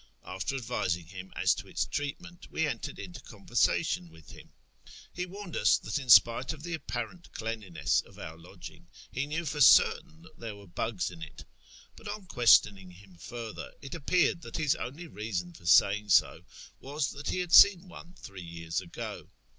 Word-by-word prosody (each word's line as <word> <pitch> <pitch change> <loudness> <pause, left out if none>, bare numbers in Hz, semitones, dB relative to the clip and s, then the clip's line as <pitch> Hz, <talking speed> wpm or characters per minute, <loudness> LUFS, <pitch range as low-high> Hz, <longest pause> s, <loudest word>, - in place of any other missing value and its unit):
After 95 +8 -4
advising 100 -9 -2
him 90 +2 -10
as - - +3
to - - -8
its - - -1
treatment, 175 +5 -6
we 160 - 0
entered - - -5
into 175 - -9
conversation 105 -4 0
with 80 -2 -16
him. - - -14 0.6
He 180 +1 -4
warned 195 -1 -8
us - - +4
that - - -3
in 130 -3 -9
spite 115 +6 +6
of 150 -1 -12
the 175 0 -5
apparent 155 +2 -6
cleanliness 100 -10 -1
of - - -18
our 80 - -8
lodging, 85 -1 -13 0.2
he 135 +3 -2
knew 165 +3 -3
for 150 0 -3
certain 160 +4 +5
that 160 - -18
there 115 -3 -6
were 100 0 -14
bugs 95 +2 -3
in 85 -2 -12
it; 80 - -10 0.5
but 220 - -12
on 205 -1 -6
questioning 105 - +4
him 90 +1 -17
further, 115 +3 -8
it 135 - -9
appeared 170 +2 +1
that 170 - -7
his 150 -3 +2
only 150 +8 -6
reason 105 - -5
for 85 - -12
saying 100 +3 +4
so - - +3 0.3
was 145 +1 -3
that 145 +1 -6
he - - -1
had 180 -2 -3
seen 195 -2 +8
one 175 0 -13
three 95 -2 -10
years 85 0 -4
ago. 85 - -8
120 Hz, 180 wpm, -29 LUFS, -, 0.6 s, seen